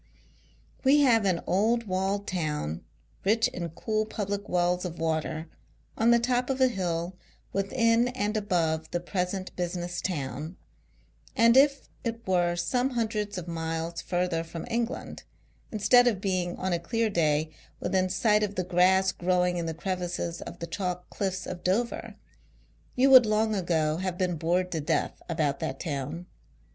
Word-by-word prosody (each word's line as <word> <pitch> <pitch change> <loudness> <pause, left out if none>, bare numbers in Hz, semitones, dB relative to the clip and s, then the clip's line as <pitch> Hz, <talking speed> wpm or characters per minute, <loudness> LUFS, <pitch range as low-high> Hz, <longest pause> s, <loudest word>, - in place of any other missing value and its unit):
We 285 +2 +5
have 230 -6 +4
an 180 -3 +1
old 225 +5 +2
walled 195 +1 -1
town, 150 - -3 0.4
rich 225 +3 +3
in 170 -1 -5
cool 215 +6 -2
public 205 -1 -4
wells 180 0 +1
of 175 -2 -5
water, 160 0 -2 0.5
on 225 +1 +3
the 235 - +7
top 245 +2 0
of 265 0 -1
a 260 -1 +5
hill 175 -4 -2 0.4
within 230 +4 +2
and 210 -4 -2
above 165 -6 0
the 175 - -1
present 185 +1 -3
business 175 0 -3
town; 150 0 -4 0.8
and 230 +1 +5
if 275 +1 +5 0.2
it 230 -1 -4
were 175 -2 +2
some 245 +10 0
hundreds 215 -5 -2
of 175 -1 -5
miles 165 0 -3
further 175 -2 -1
from 165 0 -7
England, 235 +2 -3 0.5
instead 235 +4 +5
of 215 -6 +1
being, 185 -3 -1
on 185 -1 -1
a 170 - +1
clear 225 +7 0
day, 155 -3 +1 0.3
within 185 -1 0
sight 210 +3 +3
of 205 -1 -1
the 185 - 0
grass 185 +2 +3
growing 180 0 +1
in 170 -1 -2
the 165 - -3
crevices 175 -1 -3
of - - -8
the 170 - -5
chalk 180 +1 -4
cliffs 190 -2 -2
of 180 -1 -6
Dover, 230 +6 -1 0.8
you 265 +2 +4
would 255 -4 +9
long 215 +1 +2
ago 160 -5 0
have 185 0 -3
been 180 -2 0
bored 175 +3 0
to 160 - -2
death 145 - -1
about 150 -4 0
that 135 - -4
town. 155 +2 -4
185 Hz, 160 wpm, -28 LUFS, 170-215 Hz, 0.8 s, would